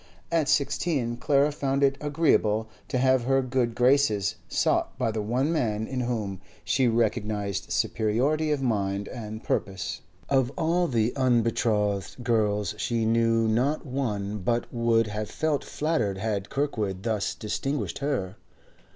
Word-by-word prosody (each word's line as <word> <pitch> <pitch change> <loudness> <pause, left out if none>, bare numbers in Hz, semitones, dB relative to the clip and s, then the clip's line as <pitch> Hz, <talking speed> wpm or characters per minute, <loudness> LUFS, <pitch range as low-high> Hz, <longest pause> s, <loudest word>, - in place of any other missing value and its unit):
At 160 -3 +2
sixteen, 140 -4 +1
Clara 140 +4 +2
found 140 -1 -1
it 135 0 +4
agreeable 140 -8 +2 0.2
to 130 - -1
have 130 -1 +3
her 135 +1 +3
good 125 -2 0
graces 125 -6 +3 0.2
sought - - +1
by 115 - 0
the 110 0 -2
one 125 +8 0
man 110 -9 0
in 130 +2 -4
whom 110 -6 -2 0.2
she 130 -2 +2
recognised 110 -4 -1
superiority 130 +9 +1
of 145 -2 0
mind 100 -4 0
and 110 -1 -7
purpose. 90 -3 -2 0.3
Of 130 -2 +2
all 170 +2 +2
the 115 -3 +1
unbetrothed 115 -4 +1
girls 105 -3 +1
she 115 -2 0
knew 115 0 +3
not 130 +9 +1
one 105 -7 -2
but 115 +5 0
would 115 -1 +2
have 105 0 -4
felt 155 -3 -1
flattered 150 -11 -1
had 100 -1 -2
Kirkwood 110 -10 -2
thus 110 -3 -1
distinguished 135 +6 -3
her. 125 -9 -2
115 Hz, 140 wpm, -26 LUFS, 105-135 Hz, 0.3 s, it